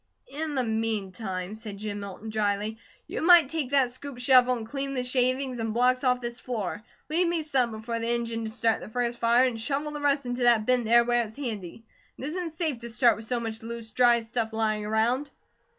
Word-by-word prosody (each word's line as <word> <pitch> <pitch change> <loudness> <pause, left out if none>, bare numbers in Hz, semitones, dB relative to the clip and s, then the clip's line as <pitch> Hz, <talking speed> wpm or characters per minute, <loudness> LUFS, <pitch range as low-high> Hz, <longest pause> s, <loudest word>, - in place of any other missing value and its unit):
"In 305 0 -3
the 260 - +1
meantime," 210 -4 -3
said 215 -2 -8
Jim 205 0 -5
Milton 200 +2 -7
dryly, 210 +1 -1 0.3
"you - - -5
might 335 -4 +7
take 315 -6 -2
that 270 -3 +3
scoop 260 +1 -5
shovel 250 0 +5
and 220 -1 -7
clean 275 +2 -3
the 250 - 0
shavings 255 0 0
and 225 -1 -2
blocks 255 +2 +3
off 250 -1 +2
this 240 0 -5
floor. 210 -5 -4 0.3
Leave 340 +4 +1
me 335 -2 0
some 265 -5 +1
before 225 +1 -4
the 230 0 -2
engine 230 -1 -1
to - - -3
start 225 -1 +1
the - - -8
first 240 +1 -2
fire, 235 +2 +4
and 235 -3 -2
shovel 285 +5 -2
the 295 0 -6
rest 280 -1 +2
into 245 +1 -3
that 235 -3 +4
bin 250 -1 +2
there 235 +2 +6
where 240 0 +2
it's 220 -1 -10
handy. 225 -7 -5 0.3
It - - -9
isn't 330 +2 -4
safe 315 -6 -2
to 235 0 -8
start 240 0 +4
with 220 - -9
so 245 +1 -1
much 225 -1 -5
loose, 230 -1 -7
dry 240 -1 +4
stuff 225 0 -3
lying 215 -1 -1
around." 235 +6 +1
235 Hz, 215 wpm, -27 LUFS, 220-260 Hz, 0.3 s, might